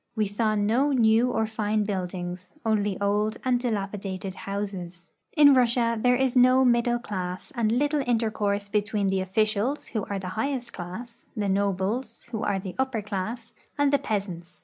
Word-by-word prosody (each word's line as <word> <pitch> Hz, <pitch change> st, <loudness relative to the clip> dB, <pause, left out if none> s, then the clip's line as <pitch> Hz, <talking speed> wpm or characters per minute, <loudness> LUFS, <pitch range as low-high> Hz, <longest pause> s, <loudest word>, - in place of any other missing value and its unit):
A\'e 215 Hz, -, +3 dB
saw 215 Hz, +2 st, 0 dB
no 230 Hz, +8 st, +2 dB
new 230 Hz, -1 st, +4 dB
or 225 Hz, -2 st, +1 dB
fine 215 Hz, -1 st, -1 dB
buildings; 180 Hz, -1 st, -4 dB
only 210 Hz, -3 st, +1 dB
old 210 Hz, +2 st, 0 dB
and 250 Hz, -1 st, +2 dB
dilapidated 195 Hz, -4 st, -3 dB
houses. 190 Hz, -4 st, -6 dB, 0.3 s
In 290 Hz, -1 st, +8 dB
Russia 235 Hz, -2 st, +3 dB
there 250 Hz, +1 st, +4 dB
is 260 Hz, 0 st, +1 dB
no 255 Hz, +1 st, +6 dB
nnddle 240 Hz, 0 st, +2 dB
class 185 Hz, -3 st, -5 dB
and 230 Hz, -4 st, +1 dB
little 290 Hz, +4 st, +1 dB
intercourse 210 Hz, -4 st, 0 dB
be 210 Hz, +1 st, +1 dB
tween 205 Hz, -1 st, -1 dB
the 190 Hz, 0 st, +1 dB
officials, 215 Hz, +7 st, 0 dB
who 215 Hz, -3 st, -2 dB
are 200 Hz, -, -3 dB
the 185 Hz, -1 st, -5 dB
highest 240 Hz, +4 st, -3 dB
clas.s 230 Hz, +7 st, -8 dB
— -, -, -24 dB
the 205 Hz, -1 st, 0 dB
nobles, 200 Hz, +4 st, -1 dB
who 220 Hz, -2 st, -3 dB
are 205 Hz, -2 st, 0 dB
the 190 Hz, -1 st, -6 dB
upper 260 Hz, -5 st, 0 dB
class 220 Hz, +3 st, -4 dB
— -, -, -40 dB
and 285 Hz, -1 st, +2 dB
the 285 Hz, -, +4 dB
peasants. 190 Hz, -8 st, -4 dB
215 Hz, 175 wpm, -26 LUFS, 195-240 Hz, 0.3 s, In